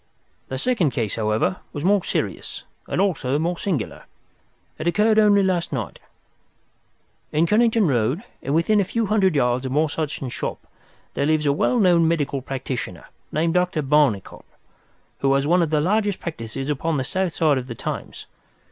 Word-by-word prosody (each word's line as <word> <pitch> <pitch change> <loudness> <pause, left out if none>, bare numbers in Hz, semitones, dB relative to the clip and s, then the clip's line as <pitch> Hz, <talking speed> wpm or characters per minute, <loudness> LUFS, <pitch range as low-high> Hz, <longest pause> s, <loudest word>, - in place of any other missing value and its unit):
"The 130 - -4
second 190 - +1
case, 115 -4 -2
however, 110 +10 0 0.2
was 145 - -5
more 195 0 +3
serious, - - -3 0.2
and - - -2
also 150 -9 +1
more 170 +3 0
singular. 170 - -3 0.7
It 160 - -3
occurred 215 +5 +3
only 205 -2 +5
last 180 -3 0
night. 120 - -4 1.3
"In 155 +2 +2
Kennington 220 +1 +3
Road, 130 - 0 0.2
and 140 +3 -1
within 205 +6 +3
a - - +2
few 230 +4 -1
hundred 195 -4 +2
yards 125 -1 +1
of 130 - -4
Morse 150 +2 0
Hudson's 145 -5 -3
shop, - - -5 0.5
there 140 - 0
lives 155 -1 +2
a 140 - +3
well 245 - +1
known 175 -5 +4
medical 145 -4 0
practitioner, 130 -7 -5 0.2
named 165 +2 +1
Dr. 180 -3 +1
Barnicot, 135 - +1 0.8
who 135 - +2
has 140 0 +1
one 175 +4 +3
of 165 - +1
the 155 -1 +2
largest 205 +4 +1
practices 135 -4 -5
upon 150 +2 -1
the 130 - 0
south 185 +5 -2
side 150 -5 +3
of 125 - -8
the 115 - -6
Thames. - - -6
155 Hz, 170 wpm, -22 LUFS, 135-185 Hz, 1.3 s, only